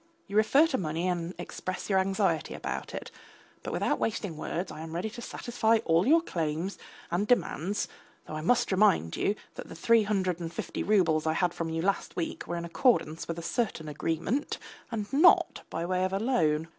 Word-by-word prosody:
You 200 - -8
refer 245 +8 +5
to 290 -5 -1
money 165 +1 -1
and 175 0 -2
express 185 +1 -5
your 195 -2 +3
anxiety 190 -3 0
about - - -5
it. - - -6 0.5
But - - -5
without - - 0
wasting 205 -6 -2
words 170 +4 -3
I - - -8
am 160 0 -7
ready 180 +6 -2
to 240 - -8
satisfy 230 -2 +1
all 165 +5 +3
your 325 +3 +5
claims 165 - -2 0.3
and 195 +5 0
demands, 205 -5 +1 0.4
though - - -8
I 155 - -3
must 230 +8 +2
remind 190 - +3
you 205 - +1 0.2
that - - -9
the - - -8
three 230 +7 +4
hundred 190 -4 0
and 165 -1 -4
fifty - - -4
roubles 165 -7 +3
I 160 - +3
had 175 +1 +1
from 165 -1 -3
you 160 0 -2
last 200 +1 -1
week 170 - -3
were 175 - -2
in 170 - -4
accordance 170 - +1
with 165 - -3
a 170 - -5
certain 195 -7 -1
agreement 165 - -1 0.3
and 215 -2 -2
not 320 +6 +5
by 165 - -3
way 185 +1 0
of 185 0 -1
a 195 - +1
loan. 160 -10 +1
185 Hz, 200 wpm, -29 LUFS, 165-215 Hz, 0.5 s, refer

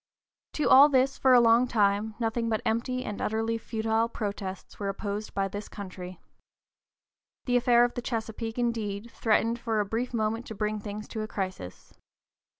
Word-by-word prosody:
To 300 - 0
all 280 +3 +8
this, 270 0 +2
for 260 - +4
a 245 - +8
long 235 +1 +5
time, 210 -1 +1
nothing 230 0 -1
but 220 -1 -1
empty 250 +3 -1
and 210 - -5
utterly 225 +1 -1
futile 225 0 0
protests 200 -4 -5
were 200 -1 -2
opposed 205 +1 -4
by 195 0 +1
this 205 +2 -7
country. 185 -2 -8 1.3
The 245 - +1
affair 240 0 +5
of 245 - -3
the 245 - -4
Chesapeake, 225 -1 -4
indeed, 230 -2 -2
threatened 230 +1 +1
for 225 -2 -1
a 205 - +1
brief 230 +5 -2
moment 225 0 -1
to 220 - -7
bring 210 +1 -1
things 210 0 -7
to 220 - -4
a 215 - -3
crisis. 185 - -6
225 Hz, 170 wpm, -28 LUFS, 205-235 Hz, 1.3 s, all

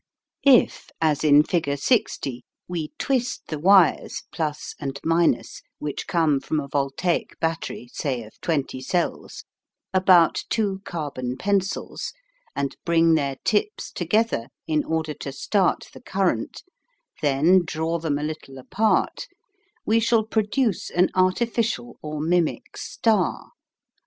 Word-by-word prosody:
If, 260 -3 +4
as 155 -2 +1
in 150 -1 +6
figure 155 -4 -1
60, 140 - 0 0.2
we 170 -3 -3
twist 255 -3 -1
the 155 - -3
wires 190 +1 +4 0.3
(+ 150 0 -10
and 140 -1 -4 0.4
) - - -14
which 150 -1 -5
come 160 -5 +2
from 155 +3 -2
a 140 - -5
voltaic 140 +5 -1
battery, 165 -6 -3
say 130 -5 -2
of 110 - -16
20 140 -5 -1
cells, 175 +6 -2 0.5
about 185 -3 +5
two 200 -4 0
carbon 135 -6 -4
pencils, 195 +3 -1 0.4
and 140 -1 -2
bring 165 -1 +4
their 140 -3 +1
tips 225 - 0
together 220 - 0 0.2
in 155 -1 +1
order 160 -1 -1
to 140 - -7
start 185 +7 0
the - - -12
current, 190 - -1 0.6
then 155 +6 +4
draw 165 +1 -2
them 155 -3 -1
a 145 - -4
little 150 -3 -6
apart, 215 - 0 0.6
we 225 +1 +3
shall 230 0 +3
produce 220 0 0
an 180 +1 +2
artificial 185 - 0
or 150 0 -5
mimic 170 +1 0
star. 215 -6 0
165 Hz, 125 wpm, -24 LUFS, 145-195 Hz, 0.6 s, in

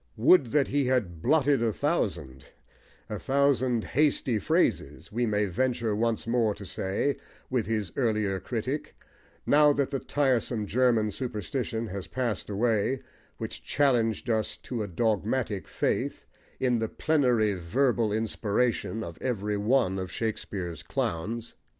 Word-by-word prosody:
"Would 140 +5 +6
that 140 +4 +2
he 140 0 +1
had 100 -11 0
blotted 145 - +3
a 115 -1 +2
thousand" 85 - -2 0.6
a - - -4
thousand 130 -4 +2
hasty 135 -5 +2
phrases, 100 - 0
we 120 +2 0
may 105 -1 +1
venture 115 +2 0
once 115 +1 0
more 115 -3 +1
to 100 - -9
say 95 +10 -1 0.3
with 125 -5 0
his 105 -5 -1
earlier 105 -6 0
critic, 125 +8 -4 0.5
now 150 0 +6
that 140 -1 0
the 135 - -1
tiresome 125 -6 0
German 115 -2 +2
superstition 115 +1 -3
has 95 -1 -5
passed 120 -7 -2
away 115 +4 +1 0.3
which - - -6
challenged 120 -6 +1
us 110 -2 0
to 120 -3 -5
a 105 - -2
dogmatic 110 +2 -1
faith - - -1 0.3
in 125 -2 +2
the 110 -1 -1
plenary 125 -9 +2
verbal 115 +5 +1
inspiration 110 +1 0
of 85 -4 -9
every 105 -5 -1
one 105 -2 +2
of 95 -1 -5
Shakespeare's 95 -7 -4
clowns. 110 +8 -3
115 Hz, 135 wpm, -28 LUFS, 105-130 Hz, 0.6 s, Would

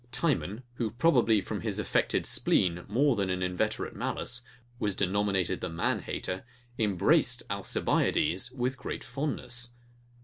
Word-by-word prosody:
Timon, 125 - 0
who 115 -3 0
probably 120 -5 +3
from - - -4
his - - -1
affected - - +1
spleen 90 -1 +2
more 130 +5 +3
than 100 -3 0
an 90 0 -1
inveterate 100 +5 -1
malice, 125 0 -1 0.4
was 100 -5 0
denominated 100 -1 +1
the - - -2
manhater, 85 +2 -2 0.4
embraced 100 -5 +3
Alcibiades 95 +9 +1
with 130 +1 -2
great - - -5
fondness. 120 -3 -2
110 Hz, 125 wpm, -29 LUFS, 95-125 Hz, 0.4 s, probably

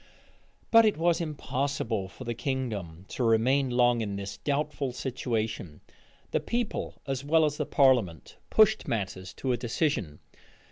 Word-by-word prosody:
But 230 0 +8
it 215 -5 +2
was 170 +1 +2
impossible 140 - -2
for 115 - -11
the 120 -1 -3
kingdom 110 - -4
to 125 - -3
remain 125 +4 +3
long 120 -1 +3
in 100 -2 -3
this 100 0 -6
doubtful 145 -2 -2
situation: 110 - -3 0.5
the - - +2
people, 235 -2 -3
as 135 -1 -3
well 160 +2 +4
as 150 -1 -1
the - - -2
parliament, 120 - +2
pushed 215 0 +4
matters 95 -4 -3
to 130 - -2
a 120 - +1
decision. 120 - -1
125 Hz, 145 wpm, -28 LUFS, 110-145 Hz, 0.5 s, But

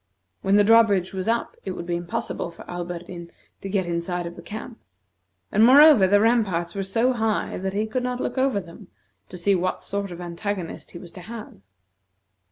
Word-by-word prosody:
When 195 - +2
the 205 - +6
drawbridge 205 -4 +4
was 190 +1 -4
up, 230 +1 -1
it 190 - -4
would 170 - -6
be 175 0 -2
impossible 170 0 -4
for 170 - -13
Alberdin 175 0 -6 0.3
to 195 - -6
get 190 -2 0
inside 175 +1 -2
of 170 0 -7
the - - -10
camp; 220 +2 -8 0.7
and, 215 - +4
moreover, 270 -4 +8
the 205 +2 +4
ramparts 205 -7 +1
were 200 - -3
so 225 +7 +1
high 220 -3 -1
that 190 +1 -3
he 210 +2 0
could 220 +4 -2
not 250 0 -3
look - - -3
over 260 -5 +2
them 170 -3 -12 0.4
to - - -8
see 195 +3 +2
what 185 0 -1
sort 200 0 -3
of 175 -1 -8
antagonist 175 +1 -5
he - - -7
was 170 -1 -11
to 180 - -11
have. 220 - -9
195 Hz, 195 wpm, -24 LUFS, 175-220 Hz, 0.7 s, moreover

